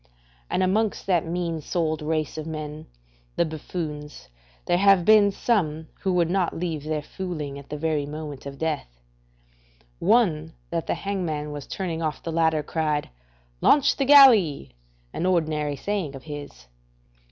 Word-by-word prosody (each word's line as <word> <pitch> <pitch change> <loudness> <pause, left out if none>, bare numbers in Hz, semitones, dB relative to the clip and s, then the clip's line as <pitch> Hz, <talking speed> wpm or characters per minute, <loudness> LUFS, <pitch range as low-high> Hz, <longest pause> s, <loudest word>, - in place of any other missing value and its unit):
And 185 - +1
amongst 210 +3 0
that 175 -4 +1
mean 170 -2 -2
souled 160 -1 -1
race 155 0 -2
of 155 0 -5
men, 155 -1 -6 0.5
the 170 - +2
buffoons, 150 - -6 0.4
there 175 0 +2
have 195 -3 +5
been 210 -1 +6
some 160 -8 0
who 190 - -1
would 175 -2 +3
not 185 -2 0
leave 165 -4 -3
their 155 -1 -2
fooling 150 -6 -5
at 140 - -14
the 150 - -4
very 150 -2 -1
moment 150 -2 -7
of 140 0 -8
death. 145 - -3 1.0
One 170 -7 +2 0.2
that 165 -1 -2
the - - 0
hang 195 -1 -3
man 150 -3 -3
was 145 -2 -7
turning 170 -4 -3
off 155 -2 -3
the 165 - -3
ladder 160 -2 +2
cried: 150 - -1 0.5
"Launch 290 -1 +4
the 275 - 0
galley," 225 - +6 0.4
an 180 - -1
ordinary 155 -5 0
saying 185 -4 -3
of 135 - -10
his. 145 - -9
160 Hz, 155 wpm, -25 LUFS, 150-185 Hz, 1.0 s, been